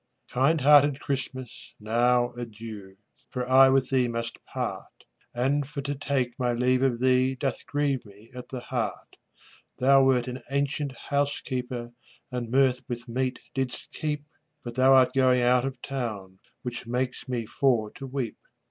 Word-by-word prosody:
Kind 140 Hz, +5 st, +2 dB
hearted 145 Hz, 0 st, +6 dB
Christmas, 130 Hz, -3 st, -5 dB
now 120 Hz, +3 st, +2 dB
adieu, 110 Hz, -4 st, -8 dB, 0.3 s
For 125 Hz, -1 st, -3 dB
I 130 Hz, +1 st, +7 dB
with 135 Hz, 0 st, +2 dB
thee 130 Hz, -2 st, +3 dB
must 115 Hz, 0 st, -4 dB
part, -, -, -4 dB, 0.4 s
And 135 Hz, +3 st, 0 dB
for 145 Hz, -1 st, -4 dB
to 145 Hz, +1 st, -2 dB
take 135 Hz, -3 st, -2 dB
my 125 Hz, -1 st, +1 dB
leave 125 Hz, +1 st, +2 dB
of 130 Hz, -3 st, +1 dB
thee 130 Hz, +1 st, +3 dB
Doth 135 Hz, +1 st, -2 dB
grieve 145 Hz, -3 st, 0 dB
me 105 Hz, +3 st, -17 dB
at 125 Hz, 0 st, -9 dB
the 130 Hz, -2 st, -5 dB
heart; 120 Hz, -3 st, -4 dB, 0.6 s
Thou 135 Hz, +1 st, +5 dB
wert 130 Hz, -2 st, +3 dB
an 125 Hz, +1 st, -5 dB
ancient 140 Hz, -1 st, -1 dB
housekeeper, 125 Hz, -4 st, -2 dB, 0.4 s
And 125 Hz, -2 st, -3 dB
mirth 130 Hz, 0 st, +3 dB
with 120 Hz, 0 st, -5 dB
meat 130 Hz, +2 st, -1 dB, 0.2 s
didst 130 Hz, -2 st, -3 dB
keep, 150 Hz, -1 st, -3 dB, 0.4 s
But 120 Hz, -, -6 dB
thou 130 Hz, +2 st, +5 dB
art 130 Hz, -1 st, +5 dB
going 130 Hz, -2 st, +4 dB
out 125 Hz, +1 st, +4 dB
of 135 Hz, -1 st, -4 dB
town, 105 Hz, -8 st, -5 dB, 0.2 s
Which 120 Hz, -2 st, -5 dB
makes 125 Hz, +2 st, -2 dB
me 120 Hz, -3 st, -2 dB
for 115 Hz, -3 st, +1 dB
to 135 Hz, -, -8 dB
weep. 130 Hz, -3 st, -4 dB
125 Hz, 155 wpm, -27 LUFS, 120-135 Hz, 0.6 s, I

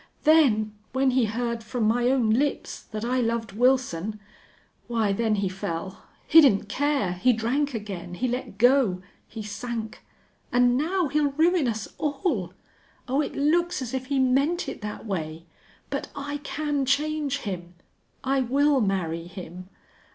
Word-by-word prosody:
Then 255 Hz, -10 st, +4 dB, 0.2 s
when 265 Hz, 0 st, +2 dB
he 255 Hz, -2 st, +3 dB
heard 235 Hz, +1 st, -2 dB
from 235 Hz, +1 st, -3 dB
my 240 Hz, +3 st, +3 dB
own 250 Hz, -5 st, +2 dB
lips 275 Hz, +6 st, 0 dB
that 215 Hz, +1 st, -5 dB
I 255 Hz, +1 st, +1 dB
loved 230 Hz, -2 st, -1 dB
Wilson 220 Hz, -4 st, +1 dB, 0.7 s
why, 225 Hz, -4 st, +1 dB
then 220 Hz, +1 st, +1 dB
he 200 Hz, -1 st, 0 dB
fell. 185 Hz, 0 st, -5 dB, 0.2 s
He 325 Hz, 0 st, +8 dB
didn't 210 Hz, -8 st, +4 dB
care. 280 Hz, -3 st, 0 dB
He 245 Hz, +8 st, +3 dB
drank 250 Hz, +5 st, 0 dB
again. 195 Hz, -5 st, -6 dB
He 255 Hz, -, -1 dB
let 250 Hz, -3 st, -4 dB
go. 240 Hz, -6 st, +3 dB, 0.2 s
He 225 Hz, -1 st, -7 dB
sank. 225 Hz, +1 st, -5 dB, 0.5 s
And 245 Hz, 0 st, +4 dB
now 340 Hz, +5 st, +1 dB
he'll 290 Hz, 0 st, +1 dB
ruin 325 Hz, -1 st, +3 dB
us 220 Hz, -3 st, -2 dB
all. 275 Hz, -, -1 dB, 0.5 s
Oh, 270 Hz, +3 st, +1 dB
it -, -, -4 dB
looks 340 Hz, +4 st, +2 dB
as 255 Hz, -2 st, -5 dB
if 260 Hz, -1 st, -3 dB
he 280 Hz, 0 st, 0 dB
meant 275 Hz, +7 st, +2 dB
it -, -, -6 dB
that 210 Hz, +1 st, -6 dB
way!... 165 Hz, -5 st, -4 dB, 0.5 s
But -, -, -2 dB
I 285 Hz, +1 st, -4 dB
can 290 Hz, 0 st, -2 dB
change 290 Hz, 0 st, 0 dB
him. 180 Hz, -4 st, -6 dB, 0.5 s
I 270 Hz, +1 st, +1 dB
will 275 Hz, +2 st, +3 dB
marry 175 Hz, -5 st, -1 dB
him. 180 Hz, 0 st, -9 dB
245 Hz, 155 wpm, -26 LUFS, 210-280 Hz, 0.7 s, He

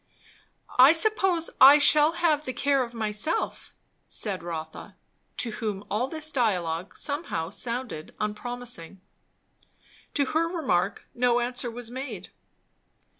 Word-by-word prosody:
"I 265 Hz, +5 st, +9 dB
suppose 365 Hz, -2 st, +2 dB, 0.2 s
I 290 Hz, -, +8 dB
shall 300 Hz, +2 st, +5 dB
have 315 Hz, -3 st, +1 dB
the 255 Hz, -, -4 dB
care 280 Hz, 0 st, +1 dB
of 240 Hz, -1 st, -5 dB
myself," 215 Hz, +8 st, -2 dB, 0.4 s
said 200 Hz, -5 st, -4 dB
Rotha; 160 Hz, -2 st, -7 dB, 0.4 s
to 235 Hz, -, -1 dB
whom 210 Hz, -2 st, -4 dB
all 220 Hz, +5 st, 0 dB
this 310 Hz, +2 st, -4 dB
dialogue 180 Hz, -, -1 dB
somehow 285 Hz, -, -3 dB
sounded 235 Hz, -8 st, -4 dB
unpromising. 210 Hz, -4 st, -5 dB, 1.2 s
To 285 Hz, -, +2 dB
her 320 Hz, +4 st, 0 dB
remark 210 Hz, -, -1 dB
no 245 Hz, 0 st, +2 dB
answer 245 Hz, 0 st, -2 dB
was 235 Hz, 0 st, -7 dB
made. 245 Hz, -8 st, -7 dB
245 Hz, 120 wpm, -26 LUFS, 210-295 Hz, 1.2 s, I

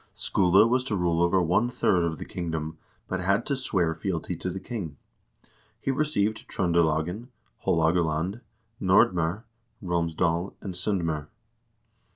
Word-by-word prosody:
Skule 95 Hz, +3 st, +4 dB
was 125 Hz, +2 st, +2 dB
to 110 Hz, -, -1 dB
rule 85 Hz, -2 st, +1 dB
over 90 Hz, +1 st, +3 dB
one 90 Hz, +8 st, +2 dB
third 95 Hz, -7 st, +2 dB
of 80 Hz, -2 st, -1 dB
the -, -, -7 dB
kingdom, 80 Hz, -2 st, -4 dB, 0.3 s
but 95 Hz, -, -2 dB
had 100 Hz, +4 st, +1 dB
to 140 Hz, -, 0 dB
swear 95 Hz, -11 st, 0 dB
fealty 85 Hz, +1 st, -3 dB
to 90 Hz, -, -4 dB
the 95 Hz, -, -4 dB
king. 95 Hz, -, -6 dB, 0.8 s
He 135 Hz, -, -1 dB
received 130 Hz, -7 st, 0 dB
Tr0ndelagen, 85 Hz, +4 st, +1 dB, 0.4 s
Haalogaland, 80 Hz, +4 st, +1 dB, 0.4 s
Nordm0r, 95 Hz, 0 st, +3 dB, 0.4 s
Romsdal, 85 Hz, 0 st, 0 dB
and 95 Hz, -, -6 dB
S0ndm0r. 85 Hz, -5 st, -1 dB
90 Hz, 130 wpm, -27 LUFS, 80-100 Hz, 0.8 s, Skule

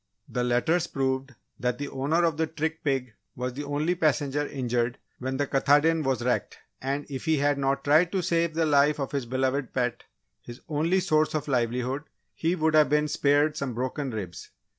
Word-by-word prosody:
The 125 Hz, -, -2 dB
letters 140 Hz, +8 st, +1 dB
proved 135 Hz, 0 st, -2 dB, 0.2 s
that 125 Hz, -1 st, -1 dB
the 145 Hz, -, -4 dB
owner 145 Hz, +6 st, 0 dB
of 165 Hz, -3 st, +2 dB
the 160 Hz, +1 st, 0 dB
trick 160 Hz, +1 st, -3 dB
pig 135 Hz, -5 st, -1 dB, 0.2 s
was 125 Hz, 0 st, -3 dB
the 145 Hz, +3 st, -5 dB
only 145 Hz, +4 st, 0 dB
passenger 145 Hz, -3 st, +1 dB
injured 125 Hz, -2 st, -1 dB, 0.2 s
when 130 Hz, +1 st, -3 dB
the 145 Hz, -, +1 dB
Katahdin 145 Hz, +4 st, +3 dB
was 135 Hz, -4 st, 0 dB
wrecked, 125 Hz, 0 st, -1 dB, 0.2 s
and 140 Hz, +2 st, -2 dB
if 135 Hz, +1 st, -6 dB
he 160 Hz, -1 st, +2 dB
had 145 Hz, 0 st, +1 dB
not 135 Hz, 0 st, 0 dB
tried 160 Hz, +4 st, +4 dB
to 190 Hz, -2 st, 0 dB
save 165 Hz, -1 st, +1 dB
the 165 Hz, 0 st, +2 dB
life 145 Hz, 0 st, +3 dB
of 135 Hz, -, -3 dB
his 140 Hz, -4 st, -2 dB
beloved 130 Hz, +1 st, -1 dB
pet 125 Hz, -2 st, -1 dB, 0.4 s
his 120 Hz, +1 st, -10 dB
only 165 Hz, +5 st, +1 dB
source 155 Hz, -3 st, +2 dB
of 155 Hz, -, -2 dB
livelihood, 125 Hz, +2 st, -1 dB, 0.3 s
he 165 Hz, +2 st, 0 dB
would 160 Hz, -2 st, +1 dB
have 155 Hz, -3 st, +5 dB
been 150 Hz, +1 st, +2 dB
spared 145 Hz, +1 st, +2 dB
some 130 Hz, -4 st, -3 dB
broken 130 Hz, +3 st, -2 dB
ribs. 100 Hz, -7 st, -6 dB
140 Hz, 190 wpm, -27 LUFS, 130-155 Hz, 0.4 s, have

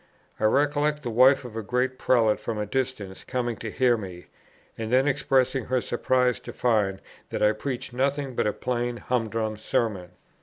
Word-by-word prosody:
I -, -, +1 dB
recollect 145 Hz, +4 st, +2 dB
the 120 Hz, -, -3 dB
wife 130 Hz, +3 st, +5 dB
of 115 Hz, -3 st, -9 dB
a 115 Hz, -, -2 dB
great 125 Hz, +4 st, -1 dB
prelate 115 Hz, -4 st, +3 dB
from 115 Hz, -, -4 dB
a 105 Hz, -, -1 dB
distance 115 Hz, -5 st, -3 dB
coming 120 Hz, -2 st, -2 dB
to 110 Hz, -, -5 dB
hear 120 Hz, +1 st, +2 dB
me, 90 Hz, -4 st, -8 dB, 0.5 s
and 110 Hz, 0 st, -5 dB
then 130 Hz, +2 st, +4 dB
expressing 135 Hz, -3 st, +1 dB
her 130 Hz, 0 st, +1 dB
surprise 125 Hz, +1 st, +1 dB
to 125 Hz, -, -9 dB
find 105 Hz, -5 st, +1 dB, 0.3 s
that -, -, -2 dB
I 105 Hz, -, +5 dB
preached 125 Hz, +2 st, -5 dB
nothing 135 Hz, +1 st, -1 dB
but 110 Hz, -, 0 dB
a 105 Hz, -, 0 dB
plain 120 Hz, -1 st, -2 dB
humdrum 115 Hz, -3 st, -2 dB
Sermon. 100 Hz, -5 st, -2 dB
120 Hz, 180 wpm, -26 LUFS, 110-130 Hz, 0.5 s, wife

